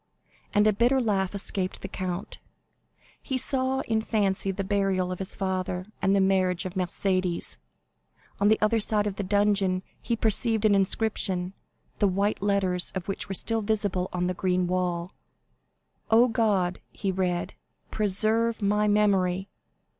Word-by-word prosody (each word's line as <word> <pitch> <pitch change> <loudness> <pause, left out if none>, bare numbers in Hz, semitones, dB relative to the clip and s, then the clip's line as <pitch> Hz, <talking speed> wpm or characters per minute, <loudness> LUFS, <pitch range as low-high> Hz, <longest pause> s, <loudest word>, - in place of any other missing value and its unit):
and 210 0 +3
a 215 - +4
bitter 240 +6 +3
laugh 200 -5 0
escaped 190 -1 -3
the - - -3
count. 185 0 -5 0.8
He 265 - -2
saw 260 0 0
in 220 -1 0
fancy 200 -3 0
the 195 +1 -2
burial 195 -2 0
of 180 - -5
his 190 - -5
father, 185 -1 -2 0.2
and 195 +1 +3
the - - +3
marriage 190 -2 +2
of 185 - -4
Mercédès. 185 -1 -1 0.8
On 200 - +3
the 215 +1 +4
other 220 +2 +3
side 210 -1 0
of 200 -2 -3
the 205 - -2
dungeon 195 -2 +1 0.2
he 235 - -1
perceived 220 0 +2
an 210 - +5
inscription, 195 -2 +1 0.5
the 205 - +4
white 200 +2 0
letters 195 -3 +1
of 185 -2 -4
which 195 0 -3
were 195 - -2
still 225 +4 +1
visible 205 -4 -1
on 180 0 -1
the 180 - 0
green 180 0 0
wall: 180 -1 -2 1.0
"'Oh, 230 +3 +6
God!'" 205 -6 +1
he 195 -2 -3
read, 180 -2 -1 0.4
"'_preserve 220 +3 +1
my 210 0 +1
memory! 195 -3 +2
195 Hz, 155 wpm, -26 LUFS, 185-215 Hz, 1.0 s, Oh